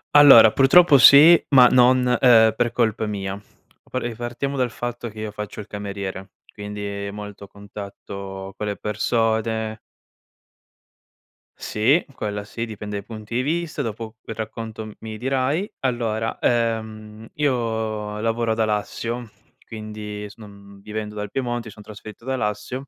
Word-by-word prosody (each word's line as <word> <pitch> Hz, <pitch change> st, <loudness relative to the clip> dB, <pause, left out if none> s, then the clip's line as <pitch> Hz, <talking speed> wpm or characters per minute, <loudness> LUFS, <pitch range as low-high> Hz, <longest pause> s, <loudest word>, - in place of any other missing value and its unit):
Allora 135 Hz, -7 st, +9 dB
purtroppo 140 Hz, +5 st, +6 dB
sì, 150 Hz, +6 st, +9 dB
ma 130 Hz, -3 st, +7 dB
non 125 Hz, +1 st, +5 dB
uhm 125 Hz, -1 st, +1 dB, 0.4 s
per 120 Hz, 0 st, 0 dB
colpa 115 Hz, -2 st, 0 dB
mia. 100 Hz, -2 st, -4 dB, 0.6 s
E 120 Hz, -1 st, -4 dB
partiamo 120 Hz, +4 st, -4 dB
dal 125 Hz, -2 st, 0 dB
fatto 120 Hz, 0 st, -5 dB
che 110 Hz, 0 st, -12 dB
io 110 Hz, -1 st, -4 dB
faccio 105 Hz, 0 st, -7 dB
il 105 Hz, -, -8 dB
cameriere, 100 Hz, -2 st, -6 dB, 0.2 s
quindi 105 Hz, -1 st, -6 dB
molto 105 Hz, -1 st, -9 dB
contatto 100 Hz, -1 st, -9 dB
con 105 Hz, -, -4 dB
le 105 Hz, -1 st, -2 dB
persone. 110 Hz, 0 st, -1 dB, 1.8 s
Sì, 130 Hz, +11 st, +1 dB
quella 105 Hz, -1 st, -4 dB
sì, 115 Hz, +2 st, -5 dB
dipende 105 Hz, -2 st, -6 dB
dai 100 Hz, -, -12 dB
punti 110 Hz, 0 st, -8 dB
di 125 Hz, -, +2 dB
vista. 155 Hz, +2 st, -2 dB
Dopo 115 Hz, -2 st, -6 dB
quel 115 Hz, -, -8 dB
racconto 110 Hz, 0 st, -6 dB
m 110 Hz, -, -9 dB
mi 110 Hz, -1 st, -7 dB
dirai. 135 Hz, -, -1 dB
Allora, 115 Hz, -3 st, -2 dB
uhm, 110 Hz, -2 st, -2 dB
io 110 Hz, -6 st, -2 dB
lavoro 115 Hz, 0 st, 0 dB
ad 110 Hz, -, -6 dB
Alassio, 110 Hz, +2 st, -2 dB, 0.4 s
quindi 105 Hz, -1 st, -7 dB
s 100 Hz, -, -15 dB
uhm, 100 Hz, -2 st, -14 dB
vivendo 105 Hz, +1 st, -6 dB
dal 105 Hz, 0 st, -5 dB
Piemonte, 120 Hz, -3 st, -3 dB
mi 110 Hz, -, -10 dB
son 105 Hz, -, -14 dB
trasferito 105 Hz, +1 st, -12 dB
ad 130 Hz, -, -4 dB
Alassio. 130 Hz, +3 st, -3 dB
110 Hz, 145 wpm, -22 LUFS, 105-120 Hz, 1.8 s, Allora